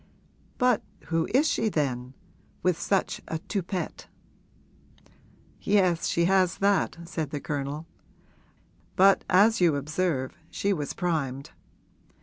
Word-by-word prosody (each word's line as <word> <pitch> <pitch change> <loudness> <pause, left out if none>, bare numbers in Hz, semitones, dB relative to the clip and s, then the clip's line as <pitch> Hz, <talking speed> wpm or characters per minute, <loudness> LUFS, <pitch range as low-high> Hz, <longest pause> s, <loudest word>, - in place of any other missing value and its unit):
'But 250 -3 +3 0.3
who 165 0 +1
is 280 +6 +4
she 225 - +1
then 130 -6 -2 0.5
with 180 -2 +2
such 195 -2 0
a 160 - -2
toupet?' 185 +1 -4 1.5
'Yes, 185 -5 +2
she 170 - +2
has 185 -1 +3
that,' 200 -2 +1
said 160 -4 -3
the 145 - -4
Colonel; 145 +2 -4 1.1
'but 195 +1 +5
as 205 +3 +5
you 170 -4 +4
observe 145 -2 -1
she 200 0 0
was 150 -6 -3
primed. 140 -7 -2
170 Hz, 115 wpm, -27 LUFS, 145-195 Hz, 1.5 s, but